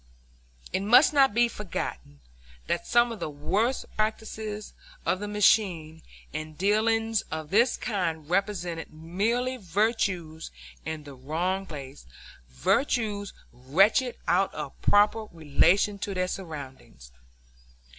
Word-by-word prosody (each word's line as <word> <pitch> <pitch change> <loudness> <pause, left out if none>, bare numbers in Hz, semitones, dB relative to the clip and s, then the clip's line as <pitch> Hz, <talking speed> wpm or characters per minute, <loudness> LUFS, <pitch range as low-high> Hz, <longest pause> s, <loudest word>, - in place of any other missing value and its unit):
It - - +1
must 240 +10 +6
not 275 -2 +5
be 240 +3 +3
forgotten 70 - -6 0.4
that - - -2
some 240 0 +4
of 225 - -7
the - - -3
worst 195 - -1
practices 215 -1 -3 0.3
of 185 - +1
the 205 - -4
machine 185 -6 +2 0.3
in 155 0 -5
dealings 220 +3 +2
of 155 -1 -5
this 235 +5 +4
kind 165 -8 -2
represented 180 -2 -2
merely 210 +11 -1
virtues 185 -5 -1 0.4
in 160 -1 -4
the 145 -1 -10
wrong 170 +9 -2
place, 140 - -9 0.4
virtues 205 - 0 0.2
wrenched 195 - +2
out 190 +2 +2
of 150 -3 -7
proper 210 +2 +3
relation 170 +6 +2
to 195 0 -4
their 185 0 0
surroundings. 135 - -8
195 Hz, 115 wpm, -27 LUFS, 155-215 Hz, 0.4 s, must